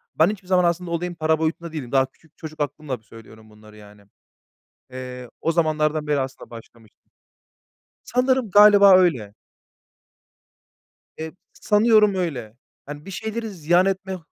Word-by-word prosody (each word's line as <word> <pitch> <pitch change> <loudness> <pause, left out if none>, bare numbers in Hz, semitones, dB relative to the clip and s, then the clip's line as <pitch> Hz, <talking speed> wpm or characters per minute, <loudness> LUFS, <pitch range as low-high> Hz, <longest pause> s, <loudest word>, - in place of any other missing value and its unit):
Ben 160 - +4
hiçbir 200 -3 -7
zaman 185 -1 +3
aslında 175 0 -1
olayın 175 +1 -3
para 160 -1 0
boyutunda 165 +1 -3
değilim. 130 -6 -6
Daha 135 -1 +3
küçük 155 +4 -26
çocuk 155 -1 -10
aklımla 145 -2 -4
söylüyorum 110 0 -16
bunları, 105 0 -17
yani. 105 -1 -16 0.9
Eee, 125 -1 -8
o 165 - 0
zamanlardan 155 -2 0
beri 145 -2 0
aslında 130 0 -7
başlamıştım. 115 -1 -16 0.9
Sanırım, 255 -1 0
galiba 205 -2 +7
öyle. 130 - +1 1.8
Eee, 160 0 -6 0.2
sanıyorum 210 -1 +3
öyle. 130 - -4 0.3
Hani, 145 +1 -9
bir 195 - -9
şeyleri 220 +3 -5
ziyan 175 0 +1
etme, 190 0 -3
160 Hz, 135 wpm, -22 LUFS, 130-190 Hz, 1.8 s, galiba